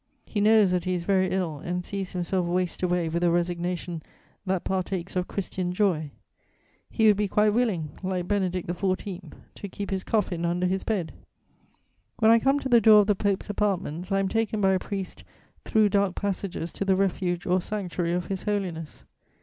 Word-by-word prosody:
_ - - -50 0.2
He 205 - -2
knows 215 -2 +5
that 180 -1 0
he 185 0 0
is 175 - -3
very 185 0 +2
ill 175 -6 -2
and 180 +2 -3
sees 195 -2 -4
himself 180 0 -1
waste 180 0 -1
away 180 -2 +1
with 170 +2 -1
a 175 - +4
resignation 175 0 -1 0.5
that 185 -1 0
partakes 185 -1 -2
of 180 0 0
Christian 185 -2 -3
joy: 180 -6 +1 0.8
he 220 - +1
would 210 -2 +6
be 210 0 +1
quite 210 +2 +3
willing, 200 -11 0
like 185 -2 -2
Benedict 185 -3 -1
XIV., 185 -1 -3 0.2
to 200 - -8
keep 200 +2 -6
his 190 -1 -1
coffin 185 -6 0
under 175 +1 0
his 190 +1 0
bed. 190 -8 -2 1.0
When 225 -1 +5
I 230 - +6
come 270 +4 +2
to - - -2
the 240 -2 +6
door 215 0 +8
of - - +1
the 210 - +3
Pope's 200 +1 -1
apartments, 190 -4 -2
I 195 - +3
am 195 0 +1
taken 225 +1 -1
by 195 -1 +3
a 190 - +2
priest 195 -1 -5 0.4
through 215 -1 +3
dark 200 -2 +1
passages 190 -4 -3
to - - -3
the 195 -1 +3
refuge 180 -2 0
or 185 +1 +2
sanctuary 180 -4 -2
of 175 -1 -1
His 190 -1 -3
Holiness. 180 -7 -3
185 Hz, 195 wpm, -26 LUFS, 175-205 Hz, 1.0 s, door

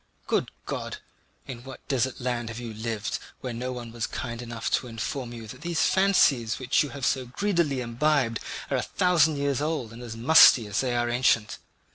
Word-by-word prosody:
Good - - 0 0.2
God! - - -4 0.5
In 120 -3 -8
what 135 0 -11
desert 130 -2 0
land 120 -2 -2
have 115 +1 -6
you 120 -2 -6
lived, 110 -1 -3 0.2
where 125 -2 -4
no 125 +2 -4
one 120 -2 -7
was 115 -1 -3
kind 120 0 -5
enough 115 -1 -4
to 125 - +1
inform 120 +2 -4
you 115 -1 -8
that 130 +5 -10
these 170 0 0
fancies 145 - +3
which 130 -1 +2
you 145 - -1
have 140 -2 -5
so 130 -1 0
greedily 170 -3 0
imbibed 120 -1 +1 0.3
are - - +2
a - - 0
thousand 170 -4 +2
years 140 -1 0
old 150 -7 -2
and 120 - -10
as 115 -2 -7
musty 125 -2 +7
as 105 -1 -1
they 125 -2 -1
are 120 0 +1
ancient? 120 -3 +1
125 Hz, 195 wpm, -26 LUFS, 115-140 Hz, 0.5 s, musty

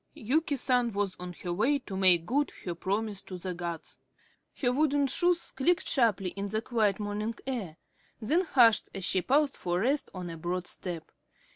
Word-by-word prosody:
Yuki 285 +6 0
San 250 -2 +2
was 200 -2 -1
on 180 0 -6
her 175 -1 -2
way 235 +11 +2
to 215 -8 -8
make 180 -3 +5
good 285 +8 0
her 175 - -2
promise 200 +3 -2
to 185 - -8
the 180 +1 -4
gods. 170 -2 -6 0.6
Her 250 -2 +2
wooden 285 0 +2
shoes 345 +5 +1
clicked 340 +6 +1
sharply 215 -8 +2
in 200 0 -4
the 215 +2 -1
quiet 220 -5 +1
morning 210 +2 -3
air, 215 -12 -4 0.4
then 295 +11 +2
hushed 235 -8 +4
as 195 -2 -2
she 185 - +2
paused 280 +5 +2
for 175 +1 -1
rest 275 +6 0
on 180 -2 -6
a 165 - -7
broad 175 +2 -3
step. 175 -2 -6
210 Hz, 180 wpm, -29 LUFS, 180-265 Hz, 0.6 s, make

